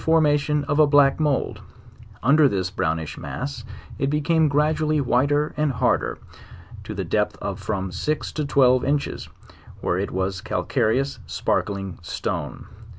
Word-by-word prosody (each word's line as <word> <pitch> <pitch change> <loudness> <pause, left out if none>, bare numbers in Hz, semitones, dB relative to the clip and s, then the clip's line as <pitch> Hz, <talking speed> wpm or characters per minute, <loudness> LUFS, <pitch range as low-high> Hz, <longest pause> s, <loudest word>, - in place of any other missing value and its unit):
formation 150 -2 +2
of 145 +1 -1
a 155 - +6
black 145 -1 +4
mould; 150 -4 0 0.6
under 140 +4 +5
this 95 -3 -2
brownish 80 -4 -2
mass 70 - -5 0.4
it 135 - +1
became 155 +2 +2
gradually 155 +1 +1
whiter 145 +3 +1
and 150 -2 0
harder, 125 +1 0 0.7
to - - -7
the - - -2
depth - - 0
of - - -4
from 95 -3 -3
six 150 +12 -2
to 155 - -2
twelve 130 -3 +4
inches, 140 +1 -1 0.5
where - - -1
it - - -2
was 95 +1 -2
a - - -14
calcare 110 +1 0
ous 140 0 -3
sparkling 95 -3 -2
stone. 85 - -4
140 Hz, 150 wpm, -23 LUFS, 105-150 Hz, 0.7 s, a